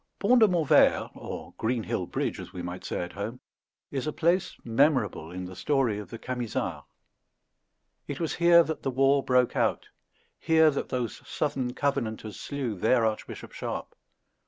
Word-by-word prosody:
Pont 240 +5 +4
de 220 - +7
Montvert, 160 -6 +4
or - - -8
Greenhill 115 0 -1
Bridge, - - -2
as - - -8
we 90 - -6
might 90 +1 -6
say - - -3
at 90 - -6
home, 110 +5 -5 0.5
is 135 +1 -3
a - - 0
place 170 +4 +1
memorable 115 - +1
in 90 +1 -6
the 90 0 -9
story 130 -3 +1
of 100 -4 -8
the 115 - -7
Camisards. 125 -1 -3 1.2
It 145 - -5
was 165 - -1
here 170 0 +7
that 160 -1 -4
the - - -1
war 135 +2 +3
broke 125 -2 +2
out; - - 0 0.5
here 160 -1 +5
that 140 - -3
those 125 -3 -3
southern 130 -4 -2
Covenanters 115 -7 -2
slew 140 -6 -3
their 115 +2 +3
Archbishop 110 -1 -4
Sharpe. - - -5
130 Hz, 160 wpm, -28 LUFS, 110-150 Hz, 1.2 s, de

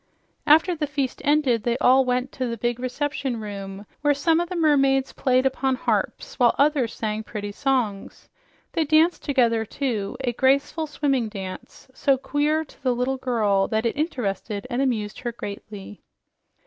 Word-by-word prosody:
After 320 +4 +5
the 300 -2 -2
feast 280 -3 -3
ended, 285 -6 +2
they 235 +2 0
all 260 +1 +5
went 250 +1 -1
to 255 -2 -3
the 235 0 -4
big 240 +2 -1
reception 260 -1 -2
room, 200 -1 -7 0.2
where 290 -1 +3
some 325 +3 +2
of 345 0 -2
the 365 - -4
mermaids 275 -5 +3
played 255 -1 +2
upon 265 0 +1
harps 255 - -2
while 240 -2 +4
others 280 -5 +2
sang 215 -1 -2
pretty 205 -1 -6
songs. 230 -5 -2 0.4
They 330 - +1
danced 315 +3 +3
together, 235 -6 +2
too 225 -4 -3
a 245 -2 -1
graceful, 280 +5 +1
swimming 275 -6 0
dance, 190 -3 -8
so 270 +1 +2
queer 295 +4 0
to - - -20
the 255 -2 +1
little 255 +2 -1
girl 215 -7 +1
that 220 +1 -1
it 230 - 0
interested 220 - -3
and 245 +2 0
amused 220 -6 -1
her 240 - -3
greatly. 205 -2 -8
255 Hz, 165 wpm, -24 LUFS, 220-285 Hz, 0.4 s, After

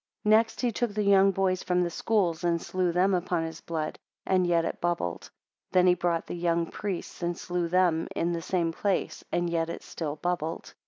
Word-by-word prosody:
Next 220 +1 +3
he 245 -2 +1
took 225 -1 -2
the 210 - +1
young 195 -1 +6
boys 190 -1 +1
from 180 -1 +1
the 170 - -2
schools, 180 -5 0
and 170 -1 +2
slew 180 +1 -1
them 185 +3 +3
upon 175 -2 0
his 160 0 -6
blood; 155 -2 -4 0.3
and 185 -1 +2
yet 170 -1 +2
it - - -4
bubbled. 170 - -2 0.4
Then 180 0 +5
he 180 - +6
brought 170 -1 0
the - - -6
young 170 -1 +1
priests 190 +1 -5
and 175 0 -1
slew 175 -1 -2
them 175 -2 +2
in 170 +1 0
the 170 - -2
same 170 -1 0
place, 195 +3 -1
and 175 0 +1
yet 165 -1 0
it - - -6
still 150 -3 -4
bubbled. 165 0 -3
175 Hz, 205 wpm, -28 LUFS, 170-185 Hz, 0.4 s, young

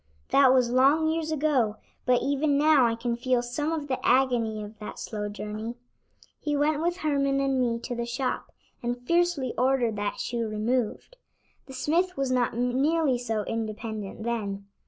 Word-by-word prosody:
That 275 -2 +6
was 250 -2 +3
long 280 +5 +4
years 320 -1 -2
ago, 275 -8 +1 0.3
but 250 -1 +3
even 285 +1 +1
now 295 -4 +5
I 230 - 0
can 235 +1 -2
feel 245 0 +1
some 290 +6 -2
of 310 -3 -3
the 260 -2 -3
agony 240 -4 +2
of 210 +1 -11
that 210 - -7
slow 210 -1 -4
journey. 215 +3 -5 0.6
He 295 -1 -1
went 300 +1 +1
with 345 +2 0
Herman 280 -4 +1
and 270 -1 +1
me 235 -2 +1
to 245 - -4
the 235 0 -3
shop, 255 +2 -3 0.3
and 245 +1 -3
fiercely 340 -7 +1
ordered 250 -4 +2
that 205 0 -2
shoe 235 -2 -2
removed. 230 - -2 0.5
The 265 - -10
smith 340 +7 0
was 270 -1 0
not 245 -2 +1
nearly 265 +3 +2
so 225 -3 -2
independent 220 -1 -4
then. 205 -4 -3
250 Hz, 170 wpm, -27 LUFS, 230-285 Hz, 0.6 s, That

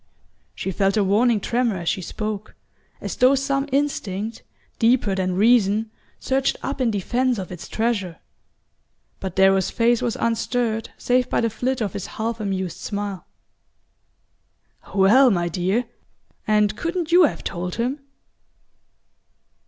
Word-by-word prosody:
She 190 - -3
felt 195 +2 +1
a 210 - +3
warning 215 +4 +3
tremor 235 -1 0
as 170 -1 -6
she 190 - 0
spoke, 215 +3 -5 0.5
as - - -5
though 255 +2 +5
some 275 +1 -1
instinct 225 -7 -2 0.4
deeper 230 -3 +3
than 185 -1 -1
reason 215 0 +3 0.3
surged 265 0 0
up 275 0 -3
in 245 - +2
defense 240 +5 0
of 185 -2 -6
its 175 -3 -8
treasure. 210 -7 -1 1.0
But 190 -2 -5
Darrow's 190 -1 +4
face 235 0 +2
was 235 0 -1
unstirred 230 -1 -1
save 250 0 +1
by - - +1
the 230 -1 0
flit 250 +3 -2
of 205 -4 -2
his 200 -3 -5
half 230 +1 -2
amused 190 -4 -3
smile. 200 -2 -5 1.7
"Well, 220 +8 +6
my 175 -5 +1
dear 185 +8 0 0.6
and 210 -1 +3
couldn't 335 +2 -3
you 350 0 +7
have - - -3
told 180 +1 -4
him?" 250 +5 -2
220 Hz, 135 wpm, -22 LUFS, 195-245 Hz, 1.7 s, you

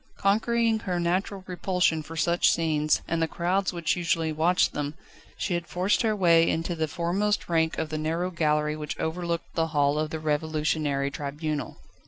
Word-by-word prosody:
Conquering 225 +3 +2
her 180 -5 -2
natural 185 +3 -1
repulsion 180 -3 0
for 160 +2 -9
such 170 +2 +3
scenes, 155 -2 +1
and 165 0 -1
the 165 - +2
crowds 185 +4 0
which 170 -3 0
usually 165 -2 0
watched 170 +4 +2
them, 145 0 -3 0.4
she 190 - -2
had 170 0 -2
forced 180 +6 +1
her 220 -3 +1
way 170 -4 +4
into 165 +2 -1
the 160 -1 -1
foremost 180 +6 -1
rank 160 -1 +1
of 160 - -2
the 155 0 -3
narrow 165 +4 -1
gallery 150 -2 +1
which 150 -1 -5
overlooked 170 +1 -3
the 165 -1 +1
Hall 145 -1 +1
of 155 0 -1
the 160 - -4
Revolutionary 150 -2 0
Tribunal. 150 +1 -4
165 Hz, 175 wpm, -26 LUFS, 155-180 Hz, 0.4 s, way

